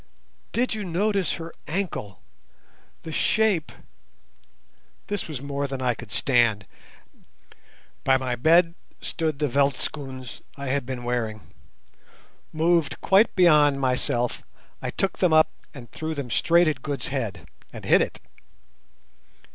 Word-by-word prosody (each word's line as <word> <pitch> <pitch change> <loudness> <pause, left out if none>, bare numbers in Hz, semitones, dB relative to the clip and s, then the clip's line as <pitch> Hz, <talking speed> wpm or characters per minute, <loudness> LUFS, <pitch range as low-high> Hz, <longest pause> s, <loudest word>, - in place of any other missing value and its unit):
"Did 245 +2 0
you 215 -1 -4
notice 195 0 0
her 165 0 -7
ankle? 155 - -4 0.8
The 160 - -6
shape—" 205 0 +1 1.3
This 205 -3 -3
was 145 -5 -6
more 140 0 -2
than 135 -1 -5
I 125 -1 +1
could 115 -2 -11
stand. 115 -6 +2 1.4
By 135 0 +4
my 130 -2 -2
bed 165 +6 +4 0.3
stood 160 -3 -2
the 150 +1 0
veldtschoons 135 -2 -2 0.2
I 140 -1 -4
had 135 -2 -1
been 130 -2 -5
wearing. 115 -3 -2 1.1
Moved 165 -1 +1
quite 200 +4 +4
beyond 150 -6 +5
myself, 125 -2 0 0.4
I - - -3
took 195 - -2
them 180 -4 +3
up 155 0 +5 0.2
and 120 -5 -12
threw 160 0 -4
them 135 -5 -5
straight 170 +7 +4
at 145 -5 -1
Good's 145 0 -3
head—and 130 -8 -6
hit - - +5
it. - - -2
140 Hz, 125 wpm, -25 LUFS, 125-170 Hz, 1.4 s, beyond